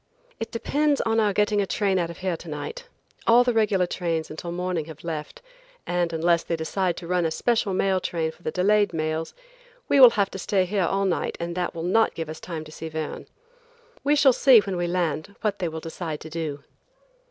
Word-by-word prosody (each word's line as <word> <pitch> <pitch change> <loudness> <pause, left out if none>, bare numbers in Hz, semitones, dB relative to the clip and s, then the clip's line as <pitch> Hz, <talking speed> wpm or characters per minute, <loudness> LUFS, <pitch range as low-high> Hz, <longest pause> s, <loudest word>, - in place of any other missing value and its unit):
"It 225 - -4
depends 290 +5 0
on 225 0 +1
our 210 -2 +3
getting 210 +1 +2
a 195 - -1
train 195 -2 +1
out 170 -1 -1
of 170 - -8
here 185 -2 +1
to 165 - -10
night. 465 - -6 0.4
All 235 +2 +7
the 245 -1 +1
regular 210 -5 +2
trains 165 -3 -2
until 170 +2 -6
morning 180 -2 -2
have 160 -1 -11
left, 155 - -6 0.4
and 175 -1 0
unless 170 +1 +2
they 170 - -2
decide 170 +2 -1
to 170 - -7
run 180 0 +1
a 165 - +1
special 225 +5 0
mail 190 0 +1
train 165 -3 -2
for 175 - -23
the - - -2
delayed 205 +3 +2
mails, 155 0 -2 0.5
we 280 - +4
will 255 -2 +11
have 200 -1 +2
to 195 - -6
stay 190 0 +1
here 190 0 0
all 195 0 0
night 185 - -1
and 170 0 -3
that 180 0 -3
will 165 - -4
not 220 +6 +2
give 165 -2 -4
us 155 - -7
time 165 -3 -6
to 155 - -13
see 160 +1 -7
Verne. 155 -1 -5 0.8
We 290 +1 +3
shall 280 -3 +5
see 260 0 +6
when 195 -2 -4
we 175 0 -1
land 175 +1 -2
what 210 -3 -1
they 180 - -1
will 160 0 -5
decide 160 -1 -5
to 160 - -9
do." 155 -3 -4
180 Hz, 220 wpm, -25 LUFS, 160-205 Hz, 0.8 s, will